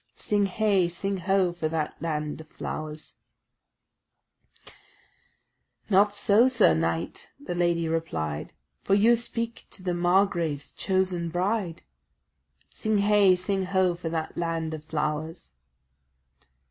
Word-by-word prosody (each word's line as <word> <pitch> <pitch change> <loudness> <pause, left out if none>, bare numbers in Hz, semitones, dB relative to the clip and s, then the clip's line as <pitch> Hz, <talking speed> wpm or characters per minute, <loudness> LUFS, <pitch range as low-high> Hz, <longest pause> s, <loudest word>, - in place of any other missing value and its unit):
Sing 205 -1 +1
heigh, 195 -2 +2
sing 195 +3 -3
ho, 190 -1 +1
for 165 -2 -2
that 155 -1 -2
land 150 -1 -3
of 160 - -14
flowers' 155 0 -7 2.7
"Not 205 +2 +4
so, 210 +4 +4
sir 245 - +4
knight," 80 +1 -2
the 195 -11 -5
lady 170 -1 +1
replied, 80 - -3 0.3
"For 195 - +3
you 225 +4 +5
speak 230 0 -4
to 185 - -13
the 180 -1 -1
margrave's 175 -4 +1
chosen 185 -3 0
bride." 180 0 -1 0.9
Sing 220 -1 0
heigh, 200 -2 +5
sing 190 +1 -2
ho, 185 -1 +2
for 170 -1 -5
that 160 -1 -3
land 165 -2 -2
of 155 -1 -6
flowers! 155 - -3
175 Hz, 120 wpm, -26 LUFS, 160-200 Hz, 2.7 s, you